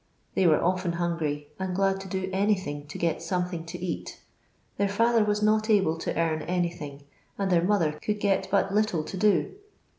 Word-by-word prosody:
They 185 - +3
were 155 -2 +5
ofUn 180 -1 0
hungry, 160 -4 -2
and 190 -1 -2
glad 195 0 +2
to 195 - -8
do 190 0 -2
anything 185 -7 0
to 145 - -7
get 170 -2 0
something 180 -3 -2
to 175 +2 -6
eat. 175 -1 -5 0.6
Their 200 0 +1
father 230 +2 +3
was 210 0 0
not 215 +1 +2
able 190 -7 +3
to - - -3
earn 160 -2 +1
anything, 170 -6 -3 0.3
and 195 -1 -1
their 170 -1 +4
mother 180 -5 +2
could 210 +8 -3
get 195 -2 +1
but 195 0 +1
little 210 -7 +1
to 190 - -7
do. 200 -2 +2
185 Hz, 185 wpm, -27 LUFS, 165-200 Hz, 0.6 s, were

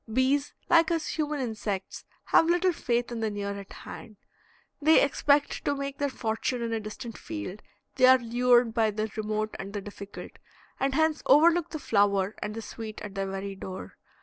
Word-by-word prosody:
Bees, 265 +4 +2 0.2
like 330 -1 +5
us 330 -2 -1
human 300 -2 -2
insects, 215 -6 -4 0.2
have 325 - +4
little 355 +1 +3
faith 240 -4 -1
in 235 - -4
the 220 -1 0
near 205 -1 -3
at 200 - -11
hand; 215 -3 -10 0.6
they 315 +2 +6
expect 285 +1 +2
to 285 - 0
make 275 0 -5
their 285 -1 +1
fortune 235 0 -2
in 230 -1 -2
a 225 - 0
distant 220 +2 -7
field, 110 - -6 0.4
they 255 -1 +6
are 260 0 +8
lured 240 -1 +3
by 225 -2 +3
the 215 +1 -3
remote 215 0 -2
and 195 +1 -6
the 205 - -3
difficult, 200 0 -9 0.5
and 270 0 0
hence 315 0 +2
overlook 330 +4 +5
the 315 - -4
flower 200 -6 +2
and 210 0 -4
the 225 - -5
sweet 220 -1 -7
at 205 -2 -7
their 195 0 -2
very 195 +1 -4
door. 190 -1 -8
230 Hz, 185 wpm, -28 LUFS, 210-280 Hz, 0.6 s, are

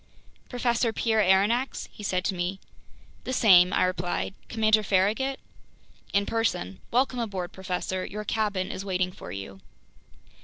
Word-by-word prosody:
"Professor 240 -2 +1
Pierre 220 -1 +1
Aronnax?" 205 +7 +2
he - - -12
said 185 -2 -1
to - - +1
me. 180 +2 -3 0.6
"The 255 - -3
same," 185 -7 +6
I - - +2
replied. 180 +1 -1 0.2
"Commander 220 -1 +3
Farragut?" 210 +8 +1 0.7
"In 200 0 +2
person. 215 - -1
Welcome 250 +1 +1
aboard, 195 -6 -3
professor. 185 0 -3
Your 210 +2 -5
cabin 205 -3 -1
is 190 - -5
waiting 185 -2 -1
for 90 - -10
you." 95 0 -7
200 Hz, 140 wpm, -27 LUFS, 185-225 Hz, 0.7 s, same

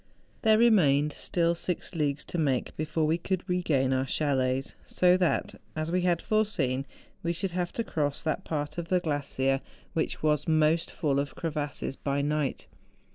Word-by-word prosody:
There 220 -1 +5
remained 150 -11 +4
still 170 -1 0
six 175 +2 -2
leagues 150 -3 -1
to 175 - -4
make 135 -5 0
before 155 +1 -1
we 160 +3 +1
could 185 +1 -2
regain 155 -8 +1
our 130 +1 0
chalets; 135 -2 0
so 180 0 +3
that, 180 -3 +1 0.2
as 155 +1 -2
we 180 +1 +2
had 175 -2 +1
foreseen, 155 -12 0 0.3
we 170 0 -1
should 185 +2 -3
have 175 0 -2
to 230 - -1
cross 145 -8 -2
that 155 - -1
part 150 +1 -3
of 170 - -4
the 180 +1 +3
glacier 140 -4 0 0.3
which 160 - -2
was 150 -1 +2
most 160 +1 +3
full 140 -3 0
of 140 0 -3
crevasses 150 -4 -3
by 140 0 -1
night. 150 -1 -1
155 Hz, 170 wpm, -28 LUFS, 140-175 Hz, 0.3 s, There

